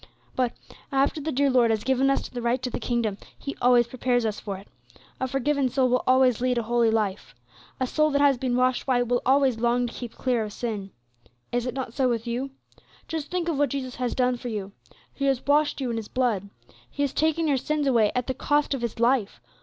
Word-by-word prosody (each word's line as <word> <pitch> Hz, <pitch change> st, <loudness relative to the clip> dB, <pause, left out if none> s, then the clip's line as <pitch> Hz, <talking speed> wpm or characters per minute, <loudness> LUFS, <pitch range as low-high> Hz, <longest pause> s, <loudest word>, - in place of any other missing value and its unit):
"But, 250 Hz, -2 st, 0 dB, 0.4 s
after 275 Hz, +3 st, +1 dB
the 315 Hz, +2 st, -2 dB
dear 280 Hz, 0 st, +2 dB
Lord 245 Hz, -2 st, +4 dB
has 220 Hz, -2 st, 0 dB
given 265 Hz, +1 st, +2 dB
us 275 Hz, -, 0 dB
the 245 Hz, -, -6 dB
right 240 Hz, +2 st, +1 dB
to 250 Hz, -, -2 dB
the -, -, -3 dB
kingdom, 230 Hz, -4 st, -1 dB, 0.2 s
He 280 Hz, -, -6 dB
always 245 Hz, -1 st, +5 dB
prepares 245 Hz, 0 st, 0 dB
us 215 Hz, -1 st, -2 dB
for 200 Hz, -2 st, -5 dB
it. 195 Hz, -, -14 dB, 0.5 s
A 260 Hz, -, -1 dB
forgiven 270 Hz, +1 st, 0 dB
soul 260 Hz, 0 st, +2 dB
will 250 Hz, 0 st, +2 dB
always 255 Hz, -2 st, +4 dB
lead 250 Hz, -1 st, +1 dB
a 235 Hz, -, 0 dB
holy 235 Hz, 0 st, +2 dB
life. 210 Hz, -3 st, -1 dB, 0.4 s
A 260 Hz, -, +1 dB
soul 305 Hz, +4 st, +2 dB
that 285 Hz, -1 st, +1 dB
has 280 Hz, -3 st, +4 dB
been 250 Hz, -1 st, 0 dB
washed 255 Hz, +1 st, +1 dB
white 245 Hz, -2 st, +2 dB
will 245 Hz, +1 st, +1 dB
always 265 Hz, -3 st, +3 dB
long 240 Hz, +1 st, +2 dB
to 240 Hz, -, -6 dB
keep 240 Hz, -3 st, -7 dB
clear 245 Hz, -3 st, 0 dB
of 210 Hz, -1 st, -6 dB
sin. 215 Hz, -5 st, -4 dB, 0.6 s
Is 245 Hz, +1 st, -1 dB
it 250 Hz, -, -4 dB
not 260 Hz, -4 st, -4 dB
so 260 Hz, -1 st, +1 dB
with 230 Hz, -1 st, -1 dB
you? 245 Hz, +3 st, -2 dB, 0.6 s
Just 315 Hz, -2 st, -4 dB
think 360 Hz, -2 st, -2 dB
of 315 Hz, -5 st, -1 dB
what 290 Hz, -2 st, +3 dB
Jesus 260 Hz, -1 st, -4 dB
has 250 Hz, -1 st, -2 dB
done 250 Hz, -1 st, +1 dB
for 245 Hz, -, -7 dB
you! 205 Hz, -4 st, -4 dB, 0.4 s
He 275 Hz, -, -3 dB
has 270 Hz, -2 st, +1 dB
washed 290 Hz, +1 st, +2 dB
you 255 Hz, -3 st, -2 dB
in 230 Hz, -, -2 dB
His 220 Hz, -2 st, -5 dB
blood; 225 Hz, -7 st, -1 dB, 0.4 s
He 285 Hz, -, -2 dB
has 280 Hz, -, -1 dB
taken 320 Hz, +1 st, +1 dB
your 280 Hz, -2 st, +2 dB
sins 300 Hz, +3 st, -1 dB
away 230 Hz, -6 st, +3 dB
at 250 Hz, -1 st, 0 dB
the 260 Hz, -, -2 dB
cost 290 Hz, +2 st, +1 dB
of 270 Hz, -, -3 dB
His 235 Hz, -1 st, -4 dB
life. 235 Hz, -, +2 dB
250 Hz, 235 wpm, -25 LUFS, 235-275 Hz, 0.6 s, always